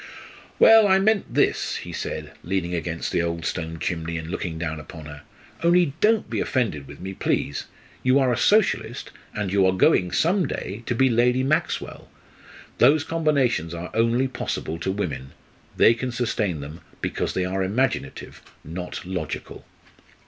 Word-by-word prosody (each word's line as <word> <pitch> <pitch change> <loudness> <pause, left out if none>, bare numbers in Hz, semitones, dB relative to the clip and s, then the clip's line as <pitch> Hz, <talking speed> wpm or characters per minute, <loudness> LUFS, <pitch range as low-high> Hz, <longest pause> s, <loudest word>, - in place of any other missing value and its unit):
"Well, 225 -1 +8
I 190 -1 +5
meant 200 +1 +1
this," - - +1
he - - -6
said, - - -5
leaning 90 -1 -2
against 85 -1 -3
the - - +1
old 85 -1 -3
stone 80 -2 -3
chimney 85 0 -3
and 80 +1 -6
looking 85 -4 -3
down 80 -1 -3
upon 80 0 -10
her; 75 -1 -9 0.4
"only 170 -3 +4
don't 220 0 +3
be - - -2
offended 105 - -1
with 70 +1 -11
me, 95 +1 -6
please. 70 - -1 0.4
You 130 +1 +4
are 130 -3 +3
a - - +1
Socialist, 210 - +1 0.2
and 105 -3 -2
you 100 -1 +4
are - - +4
going 90 -1 +3
some 180 - +2
day 100 +4 -5
to 120 - 0
be 130 +3 +4
Lady 125 +1 +3
Maxwell. 155 +5 -1 0.7
Those 150 +1 +5
combinations 140 - 0
are 85 +2 -6
only 115 +3 +2
possible 85 -9 -4
to 95 - -1
women. 85 -9 -4 0.4
They 115 - +6
can 125 +2 -4
sustain 110 - -1
them, 75 +4 -9 0.2
because - - -2
they 95 - 0
are 95 +1 -2
imaginative 115 +8 -2 0.2
not 90 +3 -6
logical." 90 -4 -5
95 Hz, 165 wpm, -24 LUFS, 85-130 Hz, 0.7 s, Well